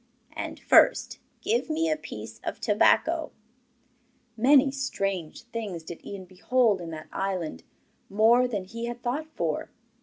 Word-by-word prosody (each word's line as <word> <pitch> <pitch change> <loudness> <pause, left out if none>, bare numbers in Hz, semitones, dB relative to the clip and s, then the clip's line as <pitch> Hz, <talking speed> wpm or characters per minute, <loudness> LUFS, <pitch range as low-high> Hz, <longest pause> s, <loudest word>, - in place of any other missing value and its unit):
And, - - -5
first, - - +4 0.2
give 450 -4 0
me 325 +1 +1
a 310 - +2
piece 310 - -9
of - - -4
tobacco.' 325 -1 +3 1.1
Many 270 +4 +5
strange 195 - -3
things 220 -8 -5
did 165 +1 -9
Ian 195 -2 -7
behold 200 +2 +1
in 170 - -6
that 155 -1 -8
island, 185 - -3 0.5
more 230 +5 +4
than 210 -6 -3
he 230 +4 -6
had 240 +1 -6
thought 275 +6 -2
for. - - -2
230 Hz, 140 wpm, -27 LUFS, 190-270 Hz, 1.1 s, Many